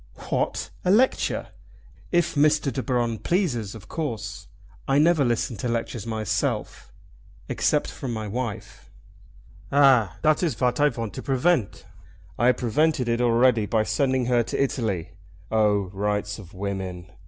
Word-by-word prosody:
"What! - - -1
a 180 - 0
lecture! 235 +7 +2 0.6
If 170 -1 +2
Mr. 150 -2 +2
De 130 - -2
Baron 120 -4 -1
pleases, 125 - -1
of 105 -2 -12
course. 115 -10 -5 0.4
I 135 - +3
never 155 0 +4
listen 120 -2 -1
to 125 - -3
lectures 115 -1 -3
myself, 110 -3 -2 0.6
except - - 0
from 130 - -5
my 110 -2 -4
wife." 105 - -5 0.8
"Ah! 130 - +4
dat 155 0 +3
is 170 -5 0
vat 125 +2 0
I 150 0 +5
vant 115 -6 -5
to - - -6
prevent." 135 - 0 0.5
"I 120 - +4
have 125 - +4
prevented 130 +2 +1
it 115 +1 +1
already 120 -2 +3
by 110 0 +2
sending 130 +3 +1
her 120 -1 +3
to 115 - -3
Italy. 110 -11 -1 0.4
Oh, 105 -4 +2
rights 105 +1 -2
of 95 -2 -13
women! 95 -2 -4
120 Hz, 145 wpm, -25 LUFS, 105-140 Hz, 0.8 s, I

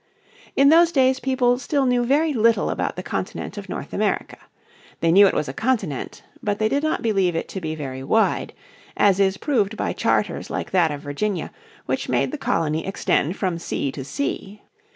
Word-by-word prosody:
In 275 +1 +6
those 335 +2 +6
days 265 -3 +3
people 255 -2 +1
still 275 +2 0
knew 245 -1 +2
very 295 +5 +2
little 225 -3 +2
about - - -2
the - - -6
continent - - -4
of - - -8
North - - -6
America. - - -1 0.6
They 165 - +2
knew 200 +3 +7
it - - 0
was 150 - 0
a 135 - -5
continent, 210 - -2 0.2
but 205 -1 -1
they 215 0 +1
did 280 +5 0
not 310 0 -1
believe 195 -6 +1
it 165 - -2
to 190 - -5
be 160 -1 -3
very 135 -3 -6
wide, 220 +11 +1 0.4
as 200 -2 +4
is 195 -1 +2
proved 220 -7 0
by - - -1
charters - - 0
like - - -4
that 175 -4 +3
of 145 -1 -5
Virginia 175 +6 -3 0.3
which - - -2
made - - +1
the 305 - -5
colony 160 - 0
extend 190 -2 0
from 180 -4 -1
sea 140 -4 -2
to 135 - -7
sea. 205 - -4
205 Hz, 195 wpm, -22 LUFS, 165-260 Hz, 0.6 s, knew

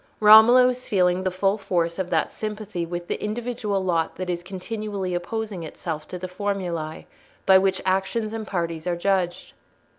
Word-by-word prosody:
Romola 220 +4 +8
was 250 0 -1
feeling 180 -2 +2
the 190 - +1
full 195 +3 0
force 175 -3 -1
of 185 -1 -2
that 165 -3 +1
sympathy 210 -5 -5
with 175 0 -5
the - - -3
individual 210 -3 -2
lot 170 -3 0
that 185 -1 -3
is 175 -1 -3
continually 195 +1 -4
opposing 200 +2 -3
itself 155 -1 -6
to 180 - -6
the 185 +1 -5
formulae 180 -5 -4 0.4
by 190 -1 +7
which 190 0 0
actions 195 +4 0
and 220 -2 -5
parties 170 -3 -3
are 175 - +1
judged. 180 -1 -1
190 Hz, 170 wpm, -24 LUFS, 175-210 Hz, 0.4 s, Romola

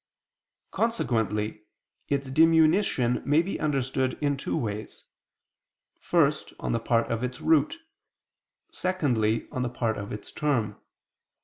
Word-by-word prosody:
Consequently 110 - -1 0.5
its 140 -1 -1
diminution 160 - +4
may 150 +4 +3
be 195 - -4
understood 135 -3 0
in 145 -1 +1
two 135 - -3
ways: 105 -2 -5 0.9
first, 150 -4 +1
on - - -2
the 115 - +1
part 115 0 +1
of 115 +1 -1
its 125 0 -3
root, 155 - +2 0.9
secondly, 125 -12 0
on 130 - -3
the 125 - -1
part 115 -3 -2
of 100 +1 -6
its 105 - -7
term. 120 -9 -1
130 Hz, 120 wpm, -27 LUFS, 115-155 Hz, 0.9 s, diminution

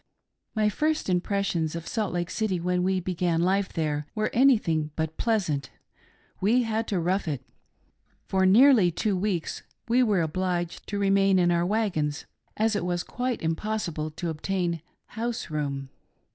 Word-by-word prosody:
My 215 -1 +3
first 305 +4 0
impressions 180 -3 0
of 170 0 -5
Salt 215 -4 -1
Lake 175 0 -2
City 210 -5 -1
when 180 +1 0
we 190 +1 +1
began 175 -2 0
life 190 +3 +1
there 150 -3 -2
were 215 0 0
anything 210 - +3
but 160 0 -2
pleasant^ 175 - 0 0.4
— - - -34
we 235 +6 +3
had 225 0 -1
to 195 - 0
"rough 180 +3 0
it." 145 -5 -3 0.8
For 190 0 +1
nearly 225 -1 +6
two 195 +4 -1
weeks 185 -3 -2 0.3
we 240 +2 +3
were 210 -7 +3
obliged 175 +1 -2
to 205 - -3
remain 195 -1 +3
in 175 -1 +3
our 170 0 +2
wagons, 180 -9 -1 0.3
as 220 0 +2
it 205 - -1
was 175 0 -1
quite 250 -4 -3
impossible 165 -2 -2
to 165 +2 -4
obtain 170 +1 -2 0.3
house 230 -4 -4
room. 140 -3 -3
185 Hz, 160 wpm, -26 LUFS, 165-215 Hz, 0.8 s, nearly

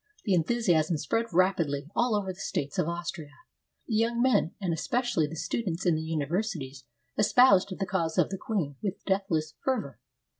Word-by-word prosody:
The 200 - +1
enthusiasm 175 -4 +2
spread 230 +9 -1
rapidly 170 -6 +1
all 240 -2 +2
over 195 -2 -1
the 180 - -18
states 145 -7 -3
of - - +1
Austria. 170 -3 -5 0.5
The 230 - -3
young 230 +2 +1
men, 250 -9 +2
and 185 -4 -1
especially 235 -2 0
the 160 - -7
students 180 +1 -3
in 175 - +4
the 155 - -1
uni 160 -2 -2
versities, 145 - -3 0.3
espoused 210 -3 +5
the 195 - -1
cause 170 -5 -1
of - - +3
the 195 - -3
queen 160 - -2
with 200 -2 -4
deathless 185 -6 0
fervor. 220 - -2
180 Hz, 175 wpm, -28 LUFS, 160-215 Hz, 0.5 s, espoused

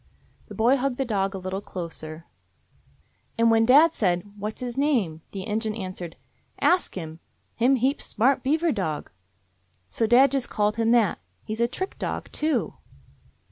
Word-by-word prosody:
The - - -10
boy 240 +5 +4
hugged 265 -1 -1
the 270 - 0
dog 195 -4 -1
a - - -3
little 185 +1 -4
closer. 165 -3 -7 1.1
"And 230 0 +4
when 225 0 +4
dad 305 +6 +7
said, 180 -4 +1
'What's 210 +1 -5
his 245 -1 -5
name?', 235 - 0
the 195 -2 -6
Injun 215 0 -1
answered, 185 -5 -6 0.4
'Ask 360 0 +2
him. 160 -3 -7 0.4
Him 250 +4 +3
heap 265 +4 0
smart 260 +5 +1
beaver 315 +5 +1
dog.' 170 - -3 0.8
So 225 - 0
dad 255 +4 +6
just 275 -3 -1
called 210 0 0
him 225 0 +1
that. 230 -5 +3 0.2
He 215 - -5
's 220 - -6
a 235 - +3
trick 375 +10 -5
dog, - - -4
too." 310 +1 0
225 Hz, 165 wpm, -25 LUFS, 190-265 Hz, 1.1 s, dad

